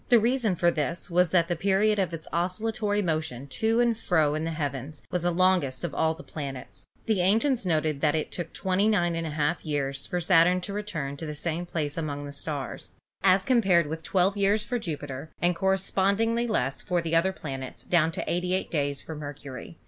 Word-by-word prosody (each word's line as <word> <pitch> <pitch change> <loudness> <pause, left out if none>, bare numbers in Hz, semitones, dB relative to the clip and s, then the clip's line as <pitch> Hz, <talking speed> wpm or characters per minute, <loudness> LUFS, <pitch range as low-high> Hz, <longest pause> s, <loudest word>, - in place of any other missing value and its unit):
The 240 - +7
reason 230 -3 +1
for 175 0 +3
this 170 +3 -3
was 180 0 +4
that 170 -1 +3
the 175 - 0
period 200 +4 +2
of 185 -4 +1
its 165 -1 -7
oscillatory 205 +4 0
motion 155 -6 -2
to 225 - +1
and 240 -1 +3
fro 160 -9 +2
in 155 +1 -2
the - - -1
heavens 145 -2 -4
was 180 -1 -1
longest 175 -6 +2
of 175 - -3
all 160 - +2
of - - -15
the 180 - -10
planets. 140 -4 -7 0.2
The 215 -5 +2
ancients 225 +4 +2
noted 155 -3 0
that 150 0 +3
it 155 - -2
took 170 -2 -5
293^ 175 -5 +1
years 140 -3 -2
for 180 - -1
Saturn 175 +1 +4
to 200 - -5
return 165 -10 -4
to 160 - -6
the 150 - -5
same 170 +3 -3
place 150 -3 -3
among 145 -3 -3
the 140 - -7
stars, 145 -2 -5 0.3
as 190 0 +4
compared 195 - +4
with 160 +2 -5
12 185 +4 +2
years 200 +2 +2
for 245 +2 -2
Jupiter,, 145 - -5
and 175 0 +2
correspondingly 195 +5 +1
less 135 - 0
for 180 -1 0
the 165 0 0
other 180 +3 +3
planets 135 -7 -7
down 165 -2 +2
to - - -3
88 180 +2 -1
days 140 -3 -1
for 160 - -7
Mercury. 145 0 -8
170 Hz, 195 wpm, -27 LUFS, 150-195 Hz, 0.3 s, The